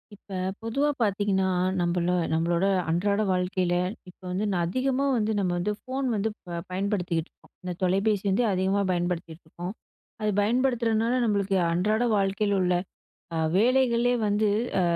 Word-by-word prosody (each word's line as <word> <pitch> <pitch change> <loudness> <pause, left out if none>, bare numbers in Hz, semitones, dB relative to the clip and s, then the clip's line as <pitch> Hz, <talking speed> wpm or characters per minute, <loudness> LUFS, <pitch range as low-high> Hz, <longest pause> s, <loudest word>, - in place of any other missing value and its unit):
இப்ப 195 -1 -8 0.3
பொதுவா 275 +6 +1
பார்த்தீங்கன்னா, 200 -2 +1 0.3
நம்பள 175 0 +1 0.2
நம்மளோட 170 +3 +1 0.2
அன்றாட 200 +5 +1
வாழ்க்கையில 180 -1 0 0.4
இப்போ 180 - -19
வந்து, 190 +4 -1 0.2
அதிகமா 260 +8 0
வந்து 220 -1 0
நம்ம 185 -2 0
வந்து 195 +4 -1
ஃபோன் 265 +1 -3
வந்து 215 +1 0 0.4
பயன்படுத்திகிட்டு 180 -4 -1
இருக்கோம். - - -26
இந்த 180 0 -3
தொலைபேசி 195 +2 +2
வந்து 195 +6 +2
அதிகமா 190 +2 +1
பயன்படுத்திகிட்டு 175 -2 -3
இருக்கோம், 175 +4 -6 0.5
அது 215 - +1
பயன்படுத்துறனால 235 0 +1
நம்மளுக்கு 200 -3 +1
அன்றாட 210 +7 +1
வாழ்க்கையில் 200 +1 +1
உள்ள 180 0 +2 0.8
வேலைகளே 245 +1 +3
வந்து 210 +1 +2 0.3
அ - - +2
200 Hz, 130 wpm, -26 LUFS, 180-220 Hz, 0.8 s, வேலைகளே